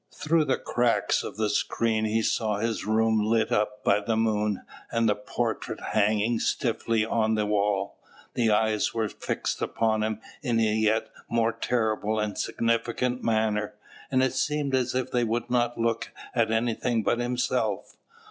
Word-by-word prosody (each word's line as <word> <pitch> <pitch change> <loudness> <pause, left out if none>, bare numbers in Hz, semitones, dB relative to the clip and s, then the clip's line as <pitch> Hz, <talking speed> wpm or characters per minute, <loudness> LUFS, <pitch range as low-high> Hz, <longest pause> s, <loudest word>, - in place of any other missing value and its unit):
Through 160 0 +2
the 135 - +1
cracks 120 -1 +1
of - - -7
the 110 -1 +1
screen 110 +1 0
he 110 +1 +1
saw 110 -2 0
his 110 -1 -2
room 110 0 +2
lit 110 0 +1
up 105 0 0
by 100 +1 +4
the 110 +2 -1
moon, 105 -2 0 0.3
and 115 0 +1
the 105 - +4
portrait 105 0 -3
hanging 110 +2 +2
stiffly 115 -2 0
on 110 -1 +1
the 105 -1 +1
wall. 100 -1 0 0.3
The 115 -2 +2
eyes 110 +1 +1
were 110 -1 +1
fixed - - -3
upon 110 -1 0
him 110 0 -1 0.2
in 120 -5 +1
a - - +3
yet 110 0 +1 0.2
more 115 -1 +1
terrible 110 -2 0
and 105 -1 -2
significant 120 +2 -1
manner, 110 -2 0 0.3
and 130 -1 +3
it 130 - +1
seemed 150 0 -1
as 125 -1 +1
if 130 0 -1
they 120 -1 +2
would 115 +1 -2
not 120 -1 +1
look 115 0 -1 0.2
at 115 -2 +2
anything 115 0 0
but 120 - +1
himself. 120 -3 -1
110 Hz, 165 wpm, -27 LUFS, 110-120 Hz, 0.3 s, by